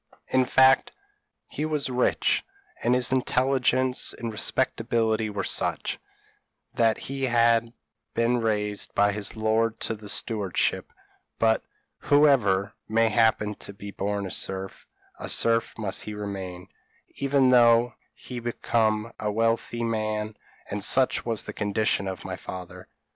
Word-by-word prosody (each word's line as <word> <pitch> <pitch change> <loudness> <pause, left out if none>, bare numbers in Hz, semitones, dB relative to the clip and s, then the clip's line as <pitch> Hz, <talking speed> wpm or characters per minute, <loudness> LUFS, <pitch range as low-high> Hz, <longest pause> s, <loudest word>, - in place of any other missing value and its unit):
In 130 0 +3
fact, 130 +1 +4 0.6
he 150 - -5
was 150 -4 0
rich 125 0 +1 0.4
and 120 +2 +2
his 125 -1 +2
intelligence 130 0 +1
and 115 -1 -4
respectability 110 -1 0
were 100 -1 -3
such, - - -2 0.7
that 115 -1 +2
he 135 0 -3
had 115 -1 +3 0.4
been 120 +1 +2
raised 105 -2 -2
by 105 0 +4
his 105 +1 -5
lord 110 +1 +1
to - - -1
the 105 -1 -8
stewardship; 105 -5 0 0.5
but, 110 0 +2 0.4
whoever 115 -10 +3 0.2
may 115 +1 +3
happen 110 -1 +2
to 100 - -7
be 100 +1 -9
born 100 0 -2
a 95 - -6
serf, 95 0 -4 0.3
a - - -5
serf 115 0 +1
must 100 -3 -2
he 105 - -6
remain, 95 -3 -6 0.5
even 140 -1 +3
though 120 -1 +5 0.2
he 125 -1 -8
become 115 -1 0
a 105 -1 -1
wealthy 115 +2 0
man: 110 -1 -2 0.4
and 100 -1 -3
such 130 +5 +2
was 115 -2 0
the - - -7
condition 105 -1 0
of 95 -1 -6
my 95 -1 -4
father. 90 0 -9
115 Hz, 135 wpm, -26 LUFS, 105-120 Hz, 0.7 s, though